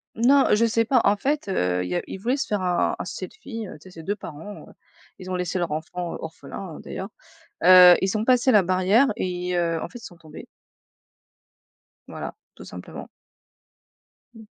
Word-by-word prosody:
Non, 265 +4 +4
heu, - - +5
je 230 +2 +3
sais 230 0 +2
pas, 250 +2 +3
en 200 - +4
fait, 285 +6 -2
heu, 90 - 0
il - - -6
y 90 - -2
a - - 0
ils - - -7
voulaient 240 +7 -1
se 285 - -2
faire, 210 -2 -1
un 180 -1 0
un - - -4
selfie, 250 - -7
tu 170 -6 -10
sais. 185 +5 -15
Ces 165 -2 -11
2 205 +4 -2
parents, 170 +5 -10 0.5
ils 185 0 -8
ont 185 - -1
laissé 180 +1 -2
leur 175 -3 -2
enfant 170 +3 -4
orphelin, 160 +2 -8
d'ailleurs. 195 - -7 0.5
Heu, 180 0 +9
ils 195 +3 0
ont 215 - -2
passé 255 +1 +4
la 210 -4 +6
barrière 185 +8 +3
et 180 -3 -3
heu, 170 -1 0
en - - -4
fait, 245 - -11
ils - - -17
sont 175 - -12
tombés. 160 -2 -12 1.6
Voilà, - - -7 0.2
tout - - -12
simplement. - - -9 1.3
Mmh. 225 -1 -14
185 Hz, 195 wpm, -24 LUFS, 175-225 Hz, 1.6 s, Heu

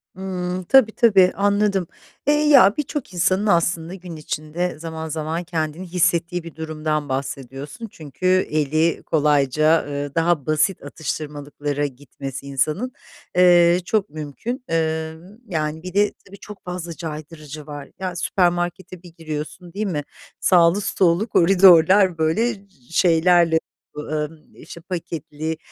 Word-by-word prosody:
Hımm, 185 -1 -4
tabii, 240 +1 +5
tabii, 195 -6 +5
anladım. 200 -2 +1 0.4
Eee, 295 - +5
ya, 290 -9 +6
birçok 290 -8 -4
insanın 185 +4 +1
aslında 170 -1 +1
gün 180 -3 -9
içinde 155 +2 -4
zaman 160 -1 -6
zaman 160 +3 -3
kendini 165 +1 -3
hissettiği 175 0 0
bir 165 -2 -10
durumdan 155 -2 -3
bahsediyorsun 135 - -5
çünkü 155 +3 -9 0.2
eli 155 +2 +1
kolayca, 150 +1 +2
eee, 145 0 -5
daha 165 -4 +1
basit 155 +3 +1
atıştırmalıklara 145 -1 -4
gitmesi 135 0 -8
insanın, 155 - -1 0.4
eee, 175 -1 +6
çok 210 -1 0
mümkün. 155 - -6
Emm, 160 +4 -3
yani, 155 -1 -2
bir 185 0 -7
de 205 +1 +2
tabii 200 +1 -13
çok 210 -2 -11
fazla 180 -2 -5
caydırıcı 155 -2 -8
var. 145 -1 -8
Ya, 185 -2 -4
süpermarkete 175 0 -1
bir 175 -2 -13
giriyorsun, 160 +2 -6
değil 210 +2 -2
mi? 150 -5 -2 0.4
Sağlı 175 +2 +4
sollu 185 +3 +1
koridorlar, 185 -1 +6
böyle, 190 +10 +1
cı 160 -4 -21
şeylerle 170 -1 +4 0.4
bö 150 - -4 0.2
ımm, 155 0 -16
işte, 170 - -12
paketli, 160 -3 -5
165 Hz, 130 wpm, -21 LUFS, 155-185 Hz, 0.4 s, ya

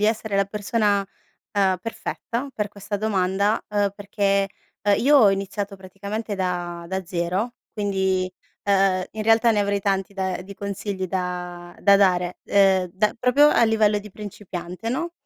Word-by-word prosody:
di - - +2
essere 220 -1 0
la 195 - +3
persona, 205 0 0 0.5
ehm, 195 -2 +2
perfetta 235 +3 -4
per 210 -1 -2
questa 205 +1 -5
domanda, 200 0 +1
uhm, 205 -1 +1
perché, 200 -1 0 0.3
ehm, 205 -1 +3
io 285 +3 +5
ho 220 -6 +7
iniziato 195 +1 -3
praticamente 200 +3 -5
da 175 -2 -3
da 190 +1 -3
0 185 +7 -1 0.2
quindi, 190 -2 0 0.3
ehm, 195 -2 +3
in 220 - -5
realtà 225 +1 +4
ne 210 - +1
avrei 200 0 +1
tanti 195 0 -1
da 190 -2 -2
di 200 +2 -10
consigli 200 -1 -4
da 180 -1 -4
da 200 -1 +6
dare, 180 -2 +2
ehm, 190 -2 +4
da 210 +2 +1
proprio 265 +4 +5
a 235 - +4
livello 215 -2 +3
di 210 +1 -11
principiante 190 -1 -7
no? 335 +8 -2
200 Hz, 155 wpm, -23 LUFS, 190-210 Hz, 0.5 s, ho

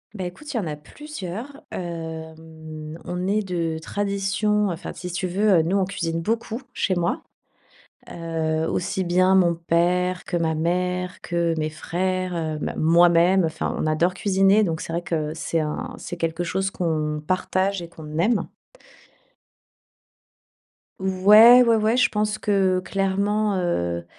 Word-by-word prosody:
Beh, 185 - -4
écoute, 295 +13 -8
il - - +1
y - - +2
en 195 - -3
a 150 - -4
plusieurs. 255 - -8
Hem, 160 -2 -7
on 180 +1 -3
est 210 +2 +1
de 165 -3 -2
tradition 205 +3 0
enfin, 165 - -6
si 180 +1 -7
tu 185 +2 -2
veux, 195 0 +3
heu, - - +4
nous 175 +5 0
on 195 - +2
cuisine 165 -3 -3
beaucoup, 230 +5 -2
chez 185 - 0
moi. 175 -1 -1 0.9
Heu, 160 -1 -2
aussi 185 +1 -1
bien, 185 +2 +3
mon 175 -3 +4
père 175 +2 0
que 175 - -3
ma 160 -1 0
mère, 180 +3 -1
que 170 -1 -1
mes 155 0 -1
frères, 175 -1 -2
bah, - - -3
moi-même 170 +3 +5
enfin, 160 0 -2
on - - -1
adore 170 +4 +1
cuisiner, 195 +2 +3
donc 165 -4 -2
c'est - - -6
vrai 170 - -1
que 155 -3 -2
c'est 165 0 -2
un 245 +12 -4
c'est 175 - -7
quelque 165 +1 -2
chose 190 +3 -1
qu'on 155 -4 -2
partage 185 +1 0
et 170 - -8
qu'on 155 -2 -9
aime. 210 +5 +1 2.5
Ouais, 210 +6 +7
ouais, 230 -1 +4
ouais. 220 +2 +2
Je 250 -1 +4
pense 210 0 -1
que, 195 -4 +2
clairement, 200 +2 0
heu 85 - -1
180 Hz, 155 wpm, -23 LUFS, 165-195 Hz, 2.5 s, Ouais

